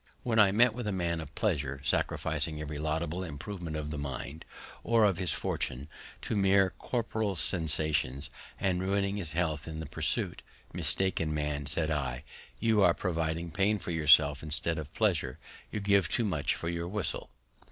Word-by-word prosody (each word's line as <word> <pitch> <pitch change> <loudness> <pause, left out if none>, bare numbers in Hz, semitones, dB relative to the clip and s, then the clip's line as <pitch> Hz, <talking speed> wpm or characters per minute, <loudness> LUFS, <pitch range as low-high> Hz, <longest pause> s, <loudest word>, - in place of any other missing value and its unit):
When 115 -2 +1
I 100 -2 +7
met 115 +3 +5
with 120 -1 -4
a - - 0
man 85 -3 -1
of 75 -2 -10
pleasure, 75 -10 -1
sacrificing 75 +1 0
every 75 -1 -5
laudable 80 +3 -2
improvement 85 +1 -6
of 75 -1 -4
the 75 - -4
mind, 70 +2 -6 0.4
or 115 -2 +4
of 95 -4 +2
his 90 -4 0
fortune, 65 +3 -2 0.4
to - - -2
mere 95 -1 +4
corporeal 110 -4 -1
sensations, 75 -5 0 0.3
and 90 -2 +1
ruining 100 +1 0
his 85 -6 -3
health 80 -3 -1
in 80 -1 -5
their 80 - -4
pursuit, - - -1 0.3
Mistaken 80 -5 0
man, 75 -1 -2
said 80 +1 +2
I, 65 -4 -2 0.4
you 110 -2 +3
are 90 -3 +5
providing 85 -2 -2
pain 100 +5 +2
for 90 - -5
yourself, 75 -3 +5
instead 80 +2 +1
of 75 -1 -7
pleasure; 85 - +1 0.3
you 105 - -2
give 100 -1 +3
too 120 - +1
much 80 -8 0
for 85 - -5
your 85 0 -2
whistle. 105 +4 -2
85 Hz, 170 wpm, -30 LUFS, 75-100 Hz, 0.4 s, I